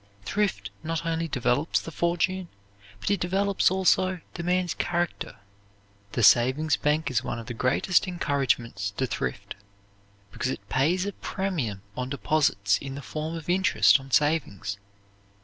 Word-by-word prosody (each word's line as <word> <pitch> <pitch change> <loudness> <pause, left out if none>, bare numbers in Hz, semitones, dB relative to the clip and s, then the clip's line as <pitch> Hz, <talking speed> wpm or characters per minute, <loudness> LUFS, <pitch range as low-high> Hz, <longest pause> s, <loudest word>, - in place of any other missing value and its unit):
Thrift 205 - -1
not 165 0 -3
only 165 0 -1
develops 125 +2 +1
the 165 - -8
fortune, 175 +3 0 0.5
but 195 - -1
it 200 - +2
develops, 195 +3 +2
also, 185 0 +2
the 175 - -5
man's 180 +1 +1
character." 175 -1 -2 0.8
The 120 - 0
savings 130 +8 +5
bank 150 -1 0
is 120 -1 +1
one 120 - -3
of 115 - -7
the 120 - -5
greatest 135 +11 +2
encouragements 130 - -1
to 130 - +1
thrift, 65 - -4 0.8
because 130 - -2
it - - -6
pays 170 +8 +2
a 205 - -3
premium 150 - -3
on 125 0 -3
deposits 135 -9 +1
in 135 -1 -6
the 140 - -7
form 155 +4 -4
of 160 -2 -7
interest 175 - +4
on 135 0 -12
savings. 135 - +1
155 Hz, 150 wpm, -26 LUFS, 125-180 Hz, 0.8 s, savings